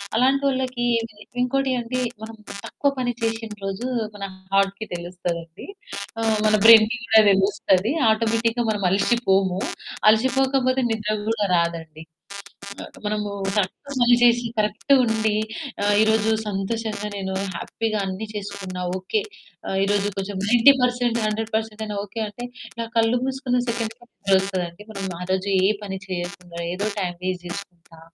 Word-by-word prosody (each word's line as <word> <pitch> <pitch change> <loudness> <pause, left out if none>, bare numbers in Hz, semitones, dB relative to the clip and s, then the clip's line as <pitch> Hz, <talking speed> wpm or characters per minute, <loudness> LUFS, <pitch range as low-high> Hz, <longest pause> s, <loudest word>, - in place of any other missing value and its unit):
అలాంటోళ్ళకి 260 0 +1
ఏంటి 230 -1 -4 0.3
ఇంకోటేంటి 265 +1 +1
అంటే 245 +2 -3 0.2
మనం 220 +1 -7 0.3
తక్కువ 285 - 0
పని 250 -1 0
చేసిన 225 0 -1 0.2
రోజు 195 +5 -3 0.3
మన 200 - -7 0.3
హార్ట్‌కి 195 +2 +2
తెలుస్తదండి. 175 -1 -5 0.8
మన 215 - +4
బ్రై‌న్‌కి 225 +1 +8
కూడా 220 0 +7
తెలుస్తది 195 +1 +2 0.2
ఆటోమేటిక్‌గా 230 +1 +1
మనం 205 -2 -2
అలిసిపోము, 195 -2 +2 0.5
అలసిపోకపోతే 260 +3 +2
నిద్ర 215 -1 -1 0.2
గూడా 210 -3 +1
రాదండి. 165 -2 -2 1.0
మనము 210 0 -1 0.3
కరెక్ట్‌గా 210 +7 -2
పని 240 0 +6
చేసి 240 0 +5
కరెక్ట్‌గుండి 220 0 +2 0.5
ఆహ్, 205 0 +3
ఈ - - +6
రోజు 220 0 +2 0.2
సంతోషంగా, 210 +1 -2
నేను 190 -1 -3 0.2
హ్యాపీగా 215 +4 -2
అన్ని 190 +3 -4
చేసుకున్న 200 -2 -6
ఆహ్, 175 - -2
ఓకే. 190 - -1 0.5
ఆహ్, 190 - -1
ఈ - - +3
రోజు 205 0 +1
కొంచెం 195 0 -3
90% 245 -1 +4
100% 220 0 -2
అయినా 210 -1 -4
ఓకే. 210 +3 -7
అంటే 240 +4 -7 0.3
నా 230 - -1
కళ్ళు 225 +2 +3
మూసుకున్న 265 -2 0
సెకండ్ 230 -1 -2
థాట్ 235 -5 -3
వస్తదండి. 190 -1 -3
మనం 200 -2 -5 0.2
ఆరోజు 185 +2 -1
ఏ - - +5 0.2
పని 190 -1 -5
చేయకుండా 175 -1 -6
ఏదో 200 +3 -2
టైమ్ 175 -2 -2
వేస్ట్ 185 -1 -3
చేసుకుంటా, 175 -3 -9
215 Hz, 130 wpm, -23 LUFS, 195-235 Hz, 1.0 s, బ్రై‌న్‌కి